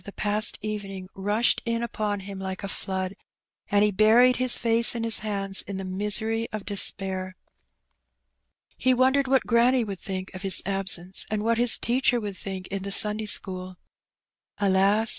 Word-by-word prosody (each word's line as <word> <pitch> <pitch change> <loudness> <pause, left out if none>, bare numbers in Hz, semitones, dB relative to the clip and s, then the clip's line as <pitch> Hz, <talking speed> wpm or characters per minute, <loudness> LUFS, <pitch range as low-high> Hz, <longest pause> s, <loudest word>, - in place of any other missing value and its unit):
the 200 - -9
past 210 +1 +1
evening 195 -3 -6
rushed 205 +4 +1
in 230 0 -2
upon 210 -3 -3
him 195 0 -8
like 190 0 -6
a - - -3
flood, 190 -1 -4 0.6
and 205 0 +3
he 210 - +2
buried 225 +5 +4
his 255 0 +4
fiice 230 +1 +3
in 230 - -3
his 230 -1 +2
hands 195 -2 -1
in 200 - -7
the 195 - -5
misery 210 +4 -1
of 215 -2 -6
despair. 190 -2 0 1.4
He 255 0 +1
wondered 265 +2 +2
what 265 0 +1
granny 240 +2 +2
would 200 -4 -7
think 185 -1 -7
of 185 - -9
his 190 -2 +2
absence, 195 -2 0
and 210 -1 -3
what 230 +1 0
his 240 -1 +6
teacher 245 0 +1
would 205 -3 -6
think 190 -1 -7
in 195 0 -4
the 200 +1 -6
Sunday 210 +2 +2
school. 185 -2 -1 0.8
AJas! 200 +3 +2
205 Hz, 170 wpm, -25 LUFS, 195-230 Hz, 1.4 s, his